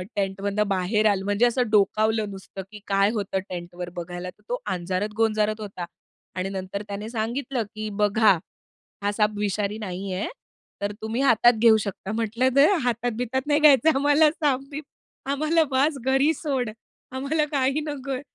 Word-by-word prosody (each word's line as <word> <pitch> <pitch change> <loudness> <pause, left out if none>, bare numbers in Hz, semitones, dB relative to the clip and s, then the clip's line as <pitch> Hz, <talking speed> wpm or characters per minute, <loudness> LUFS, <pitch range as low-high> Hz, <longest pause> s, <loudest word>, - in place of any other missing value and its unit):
टेंटमधनं 200 +1 -1
बाहेर 195 +3 +1
आल 195 -2 +1
म्हणजे 205 +4 +2
असं 240 -1 +1
डोकावलं 215 +1 +2
नुसतं, 195 0 -8
की 210 - -10
काय 195 +1 +3
होतं 200 -3 -2
टेंटवर 175 0 -6
बघायला 175 +1 -5
तर - - -16
तो - - 0
अंजारत-गोंजारत 210 +4 0
होता 190 -4 -6 0.5
आणि 185 +1 -2
नंतर 190 +1 -5
त्याने 205 +2 -5
सांगितलं 240 +2 -2
की 215 0 -4
"बघा, 210 +1 +4 0.7
हा 205 - +1
साप 210 0 +2
विषारी 205 0 -1
नाही 190 -1 -5
आहे, 185 +3 -2 0.5
तर 200 0 -1
तुम्ही 225 +4 -2
हातात 240 -2 +5
घेऊ 225 -2 +7
शकता." 200 +1 -5
म्हटलं 230 +3 0
नाही 280 +2 +7 0.2
हातात-बितात 245 +2 -1
नाही 295 0 +3
घ्यायचं 300 0 +6
आम्हाला 290 +2 +4
साप-बीप. 290 -1 -2 0.5
आम्हाला 310 +3 +2
बास 275 +3 +2
घरी 270 +4 +3
सोड. 270 -7 -2 0.4
आम्हाला 285 +4 0
काही 275 +1 +1
नकोय. 275 -2 -4
220 Hz, 150 wpm, -25 LUFS, 200-265 Hz, 0.7 s, घेऊ